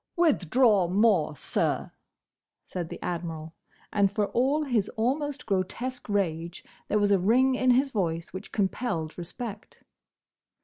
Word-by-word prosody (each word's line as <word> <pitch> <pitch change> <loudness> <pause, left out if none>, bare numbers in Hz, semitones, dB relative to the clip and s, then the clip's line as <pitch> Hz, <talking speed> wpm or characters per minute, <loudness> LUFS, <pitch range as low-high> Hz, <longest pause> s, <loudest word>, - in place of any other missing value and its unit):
'" - - -45
"Withdraw 240 - +3
more, 185 -5 +3
sir!" - - -1 0.7
said 175 -3 -5
the - - -7
Admiral, 165 -2 -4 0.4
and 200 -2 +3
for 205 0 0
all 275 +5 +2
his 235 -8 0
almost 280 +5 -1
grotesque 225 +6 -2
rage, 170 -4 -1 0.2
there 210 - +1
was 205 -1 +2
a 195 - +5
ring 250 +8 +4
in 255 0 +1
his 265 +3 +4
voice 170 -6 -2
which 185 - -8
compelled 190 -6 -1
respect. 205 +5 -8
205 Hz, 135 wpm, -27 LUFS, 175-250 Hz, 0.7 s, a